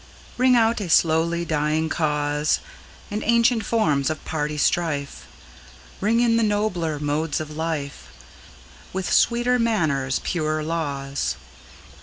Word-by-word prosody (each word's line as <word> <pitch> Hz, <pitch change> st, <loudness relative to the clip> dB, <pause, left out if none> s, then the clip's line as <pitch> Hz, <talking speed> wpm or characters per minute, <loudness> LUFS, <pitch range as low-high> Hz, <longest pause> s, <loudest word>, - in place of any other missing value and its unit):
Ring 255 Hz, 0 st, +4 dB
out 225 Hz, -1 st, +2 dB
a 185 Hz, -, -4 dB
slowly 165 Hz, +1 st, +2 dB
dying 155 Hz, 0 st, 0 dB
cause, 150 Hz, -2 st, 0 dB, 0.5 s
And 210 Hz, +1 st, -2 dB
ancient 235 Hz, 0 st, +3 dB
forms 155 Hz, -, +1 dB
of 155 Hz, -, -5 dB
party 150 Hz, -1 st, -2 dB
strife; 150 Hz, -2 st, -1 dB, 0.7 s
Ring 225 Hz, +4 st, +2 dB
in 230 Hz, -1 st, +3 dB
the -, -, +2 dB
nobler 205 Hz, -7 st, 0 dB
modes 150 Hz, +2 st, -1 dB
of 155 Hz, -1 st, -7 dB
life, 155 Hz, -3 st, -4 dB, 0.9 s
With 190 Hz, -1 st, -2 dB
sweeter 245 Hz, +1 st, +3 dB
manners, 155 Hz, -, 0 dB
purer 155 Hz, -2 st, -1 dB
laws. 140 Hz, -4 st, -2 dB
160 Hz, 120 wpm, -23 LUFS, 150-215 Hz, 0.9 s, Ring